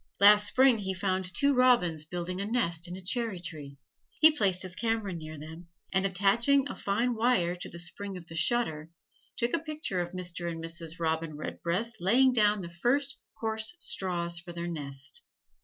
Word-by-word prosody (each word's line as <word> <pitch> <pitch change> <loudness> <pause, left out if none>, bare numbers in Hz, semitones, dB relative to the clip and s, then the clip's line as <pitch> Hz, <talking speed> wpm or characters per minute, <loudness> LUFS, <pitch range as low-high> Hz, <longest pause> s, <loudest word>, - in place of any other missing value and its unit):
Last 210 +1 +8
Spring 255 0 +4
he 190 -2 -3
found 185 0 -1
two 280 +6 +2
robins 240 - +3
building 180 +3 -4
a - - -2
nest 175 -8 0
in 175 - -6
a 190 - -10
cherry 225 -1 -1
tree: 150 -5 -8 0.4
he 315 0 +8
placed 190 -8 +3
his 185 -1 -4
camera 225 -4 -1
near 155 -2 -7
them, 160 +3 -10 0.3
and 190 +1 +3
attaching 235 +9 +3
a - - -6
fine 230 +5 0
wire 220 -7 +1
to 170 - -8
spring 195 +3 -3
the 170 -3 -9
shutter, 160 -6 0 0.5
took 235 0 0
a 335 - +2
picture 305 - -3
of 175 0 -5
Mr. 180 -1 -3
and 165 - -6
Mrs. 165 0 -1
Robin 160 -2 -2
Redbreast 185 +9 -3
laying 250 +9 +4
down 210 -3 +3
the 170 -1 -7
first 270 +10 0 0.2
coarse 220 +5 -2
straws 170 - -2
for 175 0 -10
their 170 0 -4
nest. 145 - -6
185 Hz, 175 wpm, -29 LUFS, 170-230 Hz, 0.5 s, Last